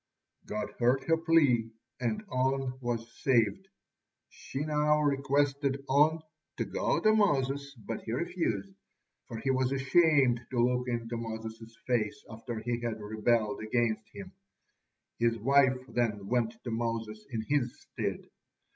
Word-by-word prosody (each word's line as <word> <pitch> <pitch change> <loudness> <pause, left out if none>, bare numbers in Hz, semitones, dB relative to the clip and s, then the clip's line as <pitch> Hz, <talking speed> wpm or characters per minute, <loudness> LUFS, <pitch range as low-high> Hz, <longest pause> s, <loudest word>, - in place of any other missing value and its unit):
God 105 0 -3
heard 125 +3 +3
her 165 +4 +3
plea, 150 -9 +3 0.3
and 210 - -2
On 130 0 0
was 120 -2 -2
saved. 125 - +2 0.6
She 135 - -6
now 150 0 +2
requested 140 -1 +1
On 155 +4 +3 0.3
to - - -1
go - - 0
to 215 0 +4
Moses, 140 -9 +1
but 110 -1 -6
he 110 - -6
refused, 120 - -2 0.5
for 115 - -6
he 135 +4 0
was 130 0 +1
ashamed 135 -3 +4
to 130 - -4
look 125 +1 +2
into 120 -1 -2
Moses' 115 0 -7
face 115 -4 0
after 115 +1 -6
he 120 +2 -2
had 115 -2 -3
rebelled 110 +3 0
against 110 0 0
him. 190 -2 -9 0.9
His 115 0 +2
wife 130 +2 +4
then 110 -6 -1
went 115 +1 0
to 120 - -4
Moses 115 -2 -3
in 115 -4 -3
his 140 -5 0
stead. - - -4
125 Hz, 140 wpm, -30 LUFS, 115-140 Hz, 0.9 s, to